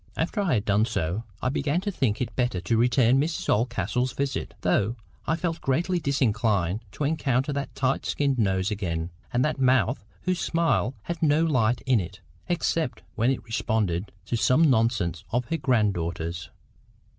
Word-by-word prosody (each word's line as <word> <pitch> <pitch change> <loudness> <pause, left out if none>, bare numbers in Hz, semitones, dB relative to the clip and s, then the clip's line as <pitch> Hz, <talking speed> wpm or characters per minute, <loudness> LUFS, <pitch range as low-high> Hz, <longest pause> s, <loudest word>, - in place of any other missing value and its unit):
After 175 +6 0
I 175 -9 +2
had 105 -1 -1
done 105 +2 +3
so, 100 -1 -2 0.2
I 130 - +2
began 145 +4 0
to 205 +1 -2
think 130 - 0
it 125 - -3
better 120 -7 0
to 85 +6 0
return 125 +2 +4
Mrs 165 +3 -2
Oldcastle's 125 +2 0
visit, 140 -1 -3
though 110 +4 +1 0.3
I 160 - +2
felt 165 -1 -3
greatly 175 +7 +1
disinclined 110 - +1
to - - -4
encounter 140 -2 0
that 140 0 -4
tight 135 0 0
skinned 140 -3 0
nose 95 -1 +1
again, 85 -5 -2 0.2
and 125 +1 +2
that 155 -2 -1
mouth 130 -3 +3 0.2
whose 185 -1 0
smile 165 -6 +1
had 170 -1 -5
no 155 0 +4
light 125 -7 +2
in 130 -4 +3
it, 90 +1 -6 0.3
except 165 -4 -1
when 115 +3 +1
it 135 - -1
responded 110 -5 -1
to 120 - -2
some 135 +6 +4
nonsense 110 -8 +1
of 120 +1 0
her 165 - 0
grand 115 -9 +2
daughter's. 85 0 -4
125 Hz, 170 wpm, -26 LUFS, 105-145 Hz, 0.3 s, return